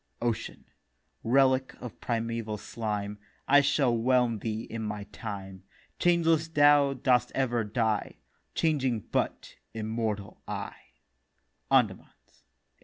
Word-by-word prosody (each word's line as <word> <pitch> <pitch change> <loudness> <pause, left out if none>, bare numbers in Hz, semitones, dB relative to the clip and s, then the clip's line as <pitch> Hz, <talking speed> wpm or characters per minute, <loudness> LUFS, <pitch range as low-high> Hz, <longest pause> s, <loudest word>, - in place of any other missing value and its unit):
OCEAN: 120 -2 -3 0.6
'Relic 130 +2 +3
of 125 -3 -9
primeval 115 -2 -2
Slime, 105 -1 -4 0.3
I 145 +1 +7
shall 140 -3 +2
whelm 120 -1 +2
thee 110 +1 -3
in 115 0 -6
my 105 -1 -4
time. 100 -2 -7 0.4
Changeless 165 -2 +3
thou 145 -3 +5
dost 125 -2 +2
ever 120 -4 +1
die; 110 0 -1 0.4
Changing 135 -8 +1
but - - -3 0.2
immortal 110 -2 -3
I.' - - -4 1.0
Andamans, - - +2
1886 - - -34
7. - - -31
115 Hz, 110 wpm, -29 LUFS, 110-135 Hz, 1.0 s, I